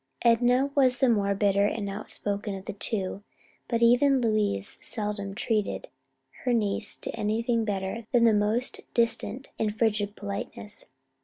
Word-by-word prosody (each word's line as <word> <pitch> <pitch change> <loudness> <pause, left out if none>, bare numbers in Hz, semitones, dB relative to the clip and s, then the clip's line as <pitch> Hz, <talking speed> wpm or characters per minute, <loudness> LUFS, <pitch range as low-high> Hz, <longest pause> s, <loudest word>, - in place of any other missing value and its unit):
Enna 245 +4 +4
was 260 -3 +3
the 265 - +3
more 200 -4 +2
bitter 200 0 +3
and 205 -1 -3
outspoken 205 0 -4
of 190 0 -8
the 210 - -4
two, 200 -1 -2 0.5
but 235 0 +1
even 260 +3 +5
Louise 215 - 0
seldom 205 -2 -3
treated 220 - -1 0.5
her 250 - +2
niece 210 -2 -1
to - - -4
anything 225 +1 0
better 205 +2 -3
than 240 -3 +4
the 230 -2 +6
most 210 +4 0
distant 235 +3 0
and 215 -1 -1
frigid 210 -3 +1
politeness. 200 +1 -6
215 Hz, 145 wpm, -27 LUFS, 205-235 Hz, 0.5 s, the